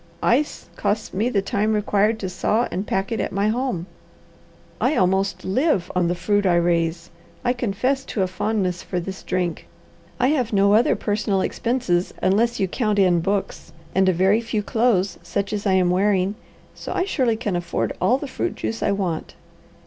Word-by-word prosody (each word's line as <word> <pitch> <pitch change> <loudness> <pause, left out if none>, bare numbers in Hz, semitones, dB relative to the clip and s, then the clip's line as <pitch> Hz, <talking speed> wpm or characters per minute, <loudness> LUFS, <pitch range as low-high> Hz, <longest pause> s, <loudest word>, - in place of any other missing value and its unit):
"Ice 280 +6 +1
costs 210 +1 -1
me 215 +6 +1
the 200 -5 0
time 210 +2 0
required 210 +1 +2
to 190 - -2
saw 210 +6 0
and 190 +4 -3
pack 195 +2 -1
it 225 - -1
at - - -2
my 200 +2 +1
home. 235 -7 -1 1.0
I 305 - +2
almost 190 0 +1
live 205 - +1
on 180 -1 +2
the 175 - 0
fruit 205 +4 +1
I 175 - +4
raise. 170 0 0 0.3
I 245 - +3
confess 255 +3 -1
to 200 - -1
a - - 0
fondness 185 -1 -1
for 180 - -3
this 190 +2 -6
drink. 180 -2 -2 0.5
I 250 +1 +3
have 255 -7 0
no 200 0 +4
other 225 +3 +4
personal 205 -2 0
expenses, 210 -6 -1
unless 230 +6 +2
you 195 - +1
count 215 +1 -1
in 180 -3 +4
books, 195 -2 -3 0.2
and 190 0 +3
a - - +5
very 190 +5 +3
few 225 -2 -2
clothes, 215 -4 +1
such 200 0 -3
as 210 0 -2
I'm 185 -2 +3
wearing; 190 +1 +2 0.4
so - - -8
I 365 - 0
surely 255 - +1
can 210 -5 -2
afford 175 0 -2
all 250 - +3
the 290 - -6
fruit 345 +6 -3
juice 225 - -4
I 200 - +2
want." 185 -5 -3
200 Hz, 185 wpm, -22 LUFS, 185-225 Hz, 1.0 s, a